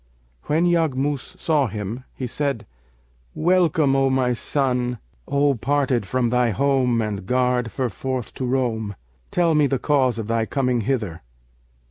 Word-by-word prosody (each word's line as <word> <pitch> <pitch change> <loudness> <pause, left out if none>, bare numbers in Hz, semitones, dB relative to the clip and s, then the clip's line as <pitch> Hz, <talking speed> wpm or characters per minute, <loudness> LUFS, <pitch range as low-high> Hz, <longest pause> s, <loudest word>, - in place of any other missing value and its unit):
When 160 +4 +2
Yaghmus 150 -1 0
saw 150 -6 +2
him, 110 +4 -5
he 130 - -4
said, 140 -1 -2 0.7
'Welcome, 165 -5 +3
O 135 0 +3
my 130 -2 +2
son, 125 -1 -1 0.3
O 140 0 +2
parted 130 -3 0
from 125 +2 0
thy 125 -1 +3
home 125 -1 +2
and 100 -3 -4
garred 125 -1 +1
ferforth 125 0 -3
to 130 - -4
roam! 115 -5 -1 0.3
Tell 170 -2 +2
me 150 -2 +4
the 135 - 0
cause 130 -4 +2
of 110 - -3
thy 115 0 0
coming 125 -4 0
hither.' 105 -9 -2
130 Hz, 140 wpm, -22 LUFS, 120-140 Hz, 0.7 s, me